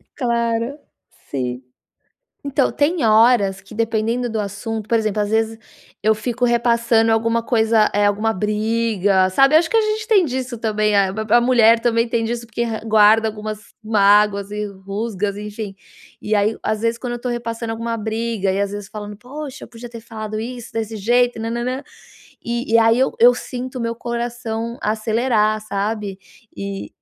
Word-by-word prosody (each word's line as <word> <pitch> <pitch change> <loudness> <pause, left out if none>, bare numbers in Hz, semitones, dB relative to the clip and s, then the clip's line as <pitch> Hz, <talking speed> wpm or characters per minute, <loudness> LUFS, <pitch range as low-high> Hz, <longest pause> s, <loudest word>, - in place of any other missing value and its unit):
Claro, 235 +1 -1 0.5
sim, 125 -2 -3 0.8
então 280 -1 +1
tem 305 +1 +1
horas 215 -3 +4
que 200 +2 -14
dependendo 230 +2 0
do 220 -1 -2
assunto, 210 +2 -5
por 230 - +3
exemplo, 215 -1 -1
às 205 - -3
vezes, 225 0 +1 0.5
eu 220 +1 +4
fico 245 +3 -2
repassando 235 -1 +3
alguma 230 +1 +1
coisa, 225 -2 +3
eh, 205 0 +3
alguma 210 +2 +1
briga, 210 -2 +1
sabe. 270 +9 +4
Acho 320 0 +3
que - - +2
a - - +6
gente 430 0 -2
tem 405 -6 +5
disso 255 -3 -3
também. 215 -2 +1
Ah, 195 -1 +3 0.2
a 240 - +6
mulher 235 -2 +5
também 230 0 +1
tem 230 -1 0
disso 235 0 -3
porque 235 +1 -2 0.2
guarda 220 +1 +5
algumas 215 0 -6 0.2
mágoas 205 -1 +3
e 210 0 -3
rusgas, 200 +1 -4
enfim, 210 -1 -6 0.5
e 215 - -1
aí, 210 +2 +2
às 215 -1 -1
vezes, 230 0 0
quando 245 0 -4
eu - - -3
estou 245 +1 -4
repassando 230 -1 -4
alguma 230 0 -3
briga 220 -2 -2
e 195 - -1
às 200 -1 0
vezes 205 -1 -6
falando: 210 -1 -8
"Poxa, 275 +5 -8
eu - - -14
podia 240 0 -10
ter 235 -1 -9
falado 215 -1 -6
isso 240 0 -7
desse 225 -1 -3
jeito 240 +3 +2
na 225 - -3
na 235 +1 -2
na" 255 +2 -3 0.6
E 235 -1 -3
e - - +7
aí 225 +1 +4
eu 265 - +2
eu 240 +2 +8
sinto 255 +1 -6
o - - -4
meu 230 0 -2
coração 235 -1 -4
acelerar, 215 0 +1
sabe, 205 -1 -3 0.4
eh, 200 0 -5
225 Hz, 175 wpm, -20 LUFS, 210-235 Hz, 0.8 s, eu